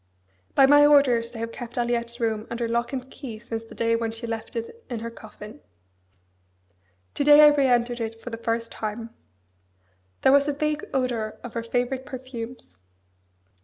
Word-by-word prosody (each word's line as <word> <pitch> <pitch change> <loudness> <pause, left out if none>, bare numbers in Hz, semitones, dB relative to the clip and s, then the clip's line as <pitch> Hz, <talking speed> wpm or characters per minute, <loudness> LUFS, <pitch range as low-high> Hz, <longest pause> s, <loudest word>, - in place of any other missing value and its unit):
By 270 - +7
my 290 +2 +7
orders 270 -6 +5
they 240 - -10
have 230 0 -3
kept 240 -1 -8
Aliette's 235 0 -1
room 220 -2 -1
under 235 0 -2
lock 235 +1 -1
and 260 -2 -4
key 240 -6 -7
since 225 0 -6
the - - -13
day 230 0 +1
when 230 -1 -1
she 225 +1 -6
left 225 0 -5
it 235 - -6
in 235 -3 -4
her 230 0 -5
coffin. 215 -1 -12 1.5
To - - 0
day 295 +1 +8
I 300 - +10
re 285 -2 +3
entered 240 -1 +2
it 225 0 -4
for 245 - -8
the 230 - -4
first 230 0 -2
time. 225 +1 -5 1.1
There 265 - +6
was 280 +1 +5
a 290 - +1
vague 300 +1 -1
odour 245 -5 -1
of 245 - -8
her 230 - -2
favourite 245 +3 -2
perfumes. 240 - -8
235 Hz, 180 wpm, -25 LUFS, 230-265 Hz, 1.5 s, I